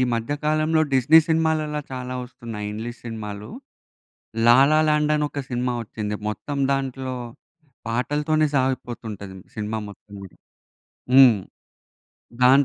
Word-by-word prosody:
మధ్య 115 +5 -2
కాలంలో 155 +1 +2
డిస్నీ 135 +5 +6
సినిమాలలా 160 -2 +1
చాలా 125 0 -5
ఒస్తున్నాయి 115 -4 -7
ఇంగ్లీష్ 120 +3 -6
సినిమాలు. 105 -2 -6 1.0
'లాల 135 +5 +6 0.2
లాండ్' 150 0 +2
అని 150 0 +1
ఒక 145 - -4
సినిమా 125 0 -1
ఒచ్చింది. 105 -1 -4
మొత్తం 140 +6 -4
దాంట్లో 130 -1 -3 0.7
పాటలతోనే 150 +6 +1
సాగిపోతుంటది 120 -7 -3 0.2
సినిమా 110 +1 -3
మొత్తం 100 0 -15
గూడ. 95 -2 -10 0.8
హ్మ్. 130 -4 +8 1.1
దాన్ 135 +3 +6
130 Hz, 110 wpm, -23 LUFS, 110-150 Hz, 1.1 s, హ్మ్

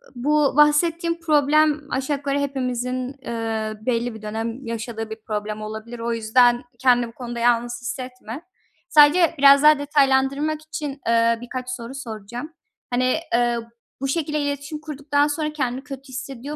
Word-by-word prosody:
bu 290 +3 +2
bahsettiğin 335 +3 +3
problem 300 -1 +3
aşağı 270 +2 -1
yukarı 280 0 -1
hepimizin, 255 -1 -2
eee, 225 -2 -3
belli 240 -1 0
bir 220 - -10
dönem 225 +4 -4
yaşadığı 225 -1 -5
bir 220 0 -8
problem 215 0 -3
olabilir. 220 +2 -7
O 235 0 -2
yüzden 240 +2 +3 0.2
kendini 245 -2 +3
bu 230 - -13
konuda 240 -1 -6
yalnız 240 0 +1
hissetme. 250 +1 -6 0.5
Sadece 310 +3 +6
biraz 280 +1 +7
daha 300 -1 +7
detaylandırmak 285 +1 +2
için, 295 -3 -6
eee, 230 0 +3
birkaç 250 +1 -6
soru 250 +1 -6
soracağım. 240 +4 -7 0.4
Hani, 255 +4 +1 0.2
ııı, 235 -1 0 0.3
bu 275 - -1
şekilde 300 +1 -1
iletişim 285 +1 -3
kurduktan 290 -1 0
sonra 300 0 -2
kendini 260 -2 -2
kötü 275 -1 -9
hissediyor 270 +2 -6
260 Hz, 145 wpm, -22 LUFS, 235-290 Hz, 0.5 s, biraz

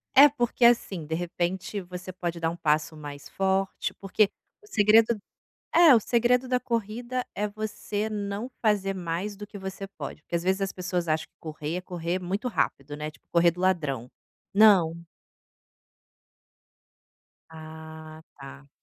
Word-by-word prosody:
É, 285 +2 +10
porque 245 -3 +1
assim, 200 -8 +3
de 160 - -4
repente, 175 +3 -2
você 180 +1 -8
pode 175 -2 -4
dar 165 - +1
um 170 - -6
passo 155 0 +1
mais 145 -1 -9
forte, 195 0 0
porque 195 +1 +2 0.3
o 415 - -17
segredo 220 - +4 0.5
é 330 -6 +8
o - - +5
segredo 245 +3 +2
da 250 0 +1
corrida 240 +2 -2
é 210 - 0
você 215 0 -3
não 205 +2 -3
fazer 205 -3 +2
mais 180 +3 -3
do 205 +1 -8
que 205 - -10
você 190 +1 -6
pode, 150 -5 -8
porque - - -4
às 170 - -1
vezes 190 +2 +1
as 195 0 0
pessoas 180 -1 -2
acham 155 0 0
que - - -51
correr 155 0 -5
é 180 - -4
correr 175 0 -3
muito 195 +7 -2
rápido, 145 - -1
né, 150 +1 -5
tipo - - -24
correr 170 0 +5
do 180 - -12
ladrão, 150 -10 0 0.4
não. 180 -6 +5 2.5
Ah, 160 0 -10 0.2
tá. 140 0 -11
185 Hz, 155 wpm, -27 LUFS, 165-215 Hz, 2.5 s, É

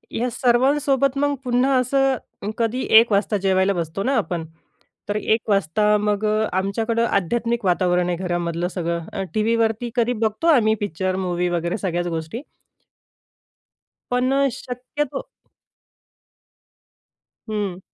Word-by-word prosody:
या 245 +2 0
सर्वांसोबत, 270 +3 +2
मग 285 0 +1
पुन्हा 250 +2 +2
असं 260 -5 -1
कधी 235 +2 0 0.2
1 230 -1 +1
वाजता 205 +1 +2
जेवायला 190 0 +2
बसतो 170 +2 -3
ना 270 +3 +1
आपण, 175 -6 -2 0.6
तर 205 - -1
1 220 +1 0
वाजता 205 +2 +2
मग 210 0 0
अ, 215 +1 +2
आमच्याकडं 225 +4 0
आध्यात्मिक 230 +4 0
वातावरण 180 -1 +2
आहे 175 - -1
घरामधलं, 175 -1 -2
सगळं 170 -2 -3
अ, 195 -2 -2
टीव्हीवरती 225 +1 +1
कधी 240 0 +2
बघतो 220 +10 0
आम्ही, 220 -2 +3
पिक्चर, 185 -1 -2
मूवी 180 -1 -1
वगैरे 175 +1 -1
सगळ्याच 175 -3 -2
गोष्टी. 165 - -4 1.7
पण 250 +1 +1 0.3
शक्यतो 255 - -4 2.3
हं. 205 -4 -3
210 Hz, 120 wpm, -22 LUFS, 180-240 Hz, 2.3 s, आम्ही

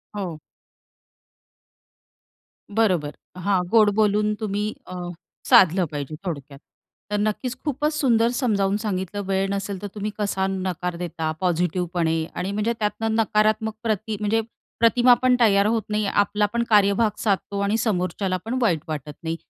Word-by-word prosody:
हो. 180 -6 -4 2.4
बरोबर, 180 -10 +2 0.3
हां, 185 0 +1
गोड 220 -1 +5
बोलून 210 0 +2
तुम्ही 210 0 -2
अ, 185 - -7 0.5
साधलं 185 0 +6
पाहिजे 145 0 -5
थोडक्यात. 140 -5 -6 0.5
तर 210 - +1
नक्कीच 215 +4 -1
खूपच 300 +1 0
सुंदर 235 -6 +3
समजावून 205 -6 +1
सांगितलं 205 -2 -3
वेळ 195 0 0
नसेल 200 -1 -3
तर 205 - -4
तुम्ही 210 +1 -3
कसा 195 -2 0
नकार 185 -2 -3
देता 165 -2 -3
पॉझिटिव्हपणे 175 -2 0
आणि 190 +2 -2
म्हणजे 210 +3 0
त्यातनं 220 +1 -1
नकारात्मक 220 0 +2
प्रती 220 -1 -1
म्हणजे 215 +2 +1 0.4
प्रतिमा 240 +2 +5
पण 255 -1 +4
तयार 200 -4 +4
होत 225 +1 +1
नाही 210 0 0
आपला 205 +1 +1
पण 235 0 +1
कार्यभाग 210 +1 +4
साधतो 200 -1 -1
आणि 200 +2 +1
समोरच्याला 185 -3 -1
पण 245 +3 -2
वाईट 180 -9 +2
वाटत 150 -1 -5
नाही. 165 0 -2
205 Hz, 140 wpm, -23 LUFS, 185-220 Hz, 2.4 s, साधलं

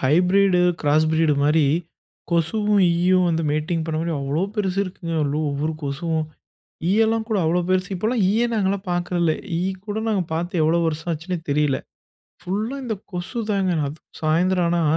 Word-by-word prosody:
Hybrid 180 +7 +3 0.2
cross 150 +1 +3
breed 160 -2 +3
மாதிரி 150 +2 +4 0.7
கொசுவும் 205 +5 +2
ஈயும் 180 +1 +3
வந்து 165 0 0
மேட்டிங் 155 +2 -1
பண்ண 160 -1 -2
மாரி 165 0 -1
அவ்ளோ 140 +5 -1
பெருசு 195 -3 -1
இருக்குங்க 175 -2 -6
அதுல 145 +1 0
ஒவ்வொரு 150 +3 -1
கொசுவும். 155 +3 -1 0.7
ஈயெல்லா 225 +2 +3
கூட 215 - +1
அவ்வளோ 170 +3 +2
பெருசு 185 -1 +1
இப்பலா 220 +7 -1
ஈயே 225 +4 +2
நாங்கலா 200 -1 +1
பார்க்கறதில்ல. 175 -2 +1 0.3
ஈ - - -1 0.3
கூட 205 - -3
நாங்க 205 -4 +1
பார்த்து 170 +1 -1
எவ்வளோ 165 +2 +3
வருஷம் 160 +2 -2
ஆச்சுன்னே 170 +3 -3
தெரியல. 145 -2 +2 0.6
ஃபுல்லா 215 +8 -2
இந்த 225 - -2 0.2
கொசுதாங்க. 195 +1 -1 0.2
அதுவும் 150 +3 -12
சாயந்திரம் 175 +3 +2
ஆனா 170 0 +1
175 Hz, 150 wpm, -22 LUFS, 160-195 Hz, 0.7 s, மாதிரி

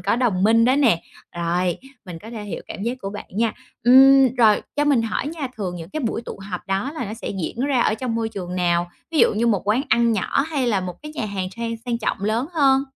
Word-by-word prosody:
có 200 +5 +1
đồng 220 -7 +1
minh 230 +2 +5
đó 255 +3 +3
nè, 235 - +3 0.3
rồi 175 +1 0 0.3
mình 175 -3 -8
có 225 - -9
thể 220 -3 -6
hiểu 205 - -6
cảm - - -7
giác 240 +4 -2
của 195 - -5
bạn 205 - -7
nha. 225 +3 0 0.3
Ừm, 265 0 +7
rồi 220 -4 +4
cho 295 - +2
mình 275 -6 +3
hỏi 225 +5 -2
nha, 295 -4 -4
thường 185 -4 -4
những 170 +2 -9
cái 310 - -3
buổi 235 -2 -2
tụ - - -8
họp 180 - -3
đó 195 +9 -1
là 310 - -3
nó 215 - -5
sẽ 230 - -7
diễn 235 - -4
ra 270 -3 +1
ở - - +2
trong 230 +1 -3
môi 225 -1 -1
trường 185 -4 -6
nào? 175 -1 +1 0.2
Ví 320 - -1
dụ - - +4
như 230 +3 +1
một 205 -5 +2
quán 235 +6 +2
ăn 235 -1 +3
nhỏ 215 +5 0
hay 290 -5 -2
là 205 -5 +1
một 180 -1 -5
cái 300 0 -8
nhà 225 - -3
hàng 190 -3 -3
sang 230 0 -3
sang 235 -1 -2
trọng 220 - -2
lớn 225 +6 0
hơn? 275 -4 +4
230 Hz, 260 wpm, -22 LUFS, 195-255 Hz, 0.3 s, Ừm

